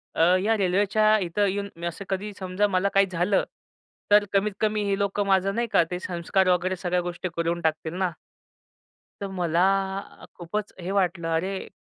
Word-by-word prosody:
अ, - - +1 0.2
या 220 +1 +2
रेल्वेच्या 205 +3 +3
इथं 200 +2 0
येऊन 200 +1 -2
मी 170 +1 -7
असं 170 +4 -6
कधी 200 +2 -2
समजा 190 +2 0
मला 195 0 +1
काही 195 0 +5
झालं 180 +3 +1 0.7
तर 205 0 +6
कमीत-कमी 210 +1 +1
हे 195 - +1
लोकं 200 0 0
माझं 195 0 +2
नाही 235 0 0
का, 185 - +5
ते 180 - -2
संस्कार 185 +2 0
वगैरे 180 +1 +1
सगळ्या 180 0 -1
गोष्टी 175 +1 -4
करून 170 +1 -1
टाकतील 160 0 -1
ना. 185 -2 0 1.1
तर 200 - -2
मला 175 -3 0 0.8
खूपच 200 +4 -4
हे 180 - -4
वाटलं, 180 -4 0
"अरे!" 190 +3 -2
190 Hz, 170 wpm, -25 LUFS, 175-200 Hz, 1.1 s, तर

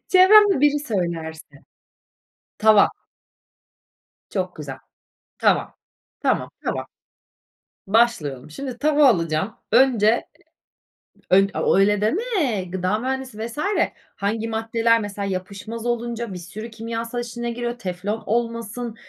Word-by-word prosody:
Çevremde 390 -2 +7
biri 295 0 +4
söylerse. 165 - -4 1.0
Tava. 215 -1 +6 1.4
Çok 185 -2 -3
güzel. 140 -3 -7 0.6
Tava. - - +2 0.5
Tamam, - - 0
tava. - - -2 1.0
Başlayalım. 190 - +1
Şimdi 255 - -6
tava 300 +1 +4
alacağım. 165 -2 +1 0.2
Önce 235 -2 +4 1.0
eee, 195 +1 +6
ö - - -1
o - - +3
öyle 205 +1 +3
deme, 295 - 0
gıda 185 +3 -1
mühendisi 260 -2 -4
vs. 235 - -11 0.6
hangi 220 +3 -2
maddeler 225 +1 +1
mesela 205 -1 -4
yapışmaz 200 +4 -5
olunca 235 -2 -2
bir - - -5
sürü 210 +7 -8
kimyasal 230 +1 -4
işine 240 0 -4
giriyor, 240 0 -4
teflon 200 +2 -4
olmasın, 230 0 -2
225 Hz, 105 wpm, -22 LUFS, 195-240 Hz, 1.4 s, Çevremde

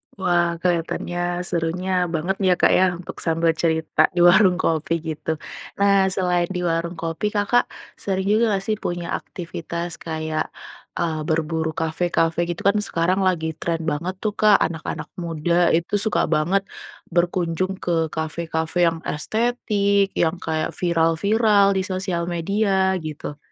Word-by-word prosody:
Wah, 175 -3 +1
kelihatannya, 175 0 -1
serunya 175 +2 -2 0.2
bangetnya 185 +3 +1
Kak - - +5
ya, 185 - +5
untuk 175 - -9
sambil 165 0 +2
cerita 160 -1 +2
di 175 - +4
warung 185 +1 +6
kopi 165 -2 0
gitu. 160 0 -3 0.4
Nah 200 -1 +4
selain 180 -2 +1
di 180 - -2
warung 170 0 -1
kopi, 165 +5 -2
Kakak 205 +4 +2 0.3
sering 190 -1 -1
juga 220 +2 +3
gak 190 - -6
sih 215 - 0
punya 175 -1 -3
aktivitas 170 0 -6 0.2
kayak, 160 -1 -2 0.5
eee, 165 -3 -1
berburu 160 0 0
kafe-kafe 165 0 0
gitu? 170 - -4
Kan 205 +1 +4
sekarang 175 +3 +1
lagi 165 -3 0
tren 165 -1 -2
banget 170 +6 -3
tuh 215 -1 0
Kak, 210 -1 +6
anak-anak 160 -1 -5
muda 165 0 -2 0.2
itu 170 +4 -2
suka 220 - +1
banget 170 +6 +2 0.5
berkunjung 175 +1 0
ke 175 - -1 0.2
kafe-kafe 160 +1 -3
yang 165 - -5
estetik, 200 +2 +1
yang 165 +1 +2
kayak 160 -1 -1
viral-viral 200 +5 +3
di - - +2
sosial 185 -2 -2
media 190 +1 +1
gitu. 150 -1 -6
175 Hz, 140 wpm, -22 LUFS, 165-190 Hz, 0.5 s, warung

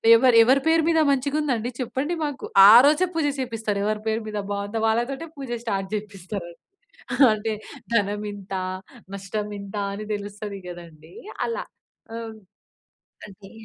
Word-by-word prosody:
ఎవరు 245 +1 +4
ఎవరి 265 +3 +4
పేరు 325 0 +4
మీద 325 -1 +3
మంచిగా 280 +2 0
ఉందండి 245 -6 -1
చెప్పండి 265 +7 -2
మాకు. 290 -3 -5 0.3
ఆరోజే 295 +9 +7
పూజ 325 -2 +1
చేపిస్తారు. 225 -5 -2
ఎవరి 215 0 -1
పేరు 220 +1 0
మీద 210 -1 -3
బాగుందా 205 +2 -3
వాళ్ళతోటే 250 +8 -1
పూజ 270 -3 -7
స్టార్ట్ 195 -4 -2
చేపిస్తారు. 200 -3 -6 0.8
అంటే 215 +1 -2 0.4
ధనం 205 -1 +1
ఇంత. 200 -1 -10 0.6
నష్టం 205 +2 -4
ఇంత. 200 +1 -10 0.2
అని 210 +1 -6
తెలుస్తది 205 0 -6
కదండీ 170 -2 -12 0.3
అలా. 475 +2 -3 0.5
ఓహ్! 225 -1 -7 0.9
అదే. 195 0 -14
215 Hz, 130 wpm, -24 LUFS, 200-260 Hz, 0.9 s, ఆరోజే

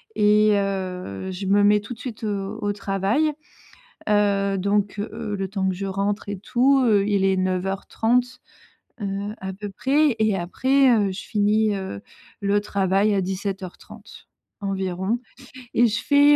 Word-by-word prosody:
Et, 210 +1 +4
heu, 190 - -3
je 190 +1 -5
me 205 +1 +4
mets 210 +1 +5
tout 205 +4 -8
de - - -21
suite, 240 -3 -7
heu, 200 -1 -3
au 205 -1 0
travail. 205 +9 0 0.8
Heu, 200 -1 +2
donc, 200 +1 0
heu, 205 0 -4
le 195 -1 -3
temps 195 0 -2
que - - -2
je 195 +2 -4
rentre 200 +2 -2
et 200 -1 -4
tout, 255 +6 +3
heu, 205 -4 +3
il 200 -2 +2
est 190 0 +3
09:30, 195 +7 0 0.6
heu, 200 +1 -3
à 190 0 -4
peu 205 +2 -7
près. 270 +6 +2
Et 215 -2 +2
après, 260 +10 +2
heu, 205 -5 +3
je 185 - -6
finis, 210 0 +1
heu, 190 - -5 0.4
le 200 0 +2
travail 200 +1 +1
à 195 - +2
17:30 190 0 -6 0.4
environ. 190 +2 -1 0.6
Et 240 - +5
je 225 +1 -1
fais 285 +1 +6
200 Hz, 160 wpm, -23 LUFS, 195-215 Hz, 0.8 s, fais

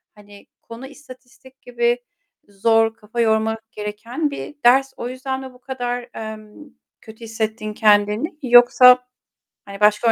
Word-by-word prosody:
hani, 205 -1 -17 0.2
konu 235 +3 -11
istatistik 260 -1 -17
gibi 240 0 -1 0.4
zor, 225 +2 +1
kafa 225 +1 -9
yormak 220 0 -1
gereken 230 +8 -5
bir 290 - -8
ders; 265 +2 +4
o 240 - -5
yüzden 265 +1 -5
mi 260 -1 -10
bu 250 - -20
kadar, 245 -1 -5
eee, 215 -1 -9 0.5
kötü 220 +1 -14
hissettin 220 -1 -4
kendini 210 - +2
yoksa, 250 +1 +6 0.6
hani, 200 0 -10
başka 210 +2 +3
230 Hz, 130 wpm, -20 LUFS, 215-250 Hz, 0.6 s, yoksa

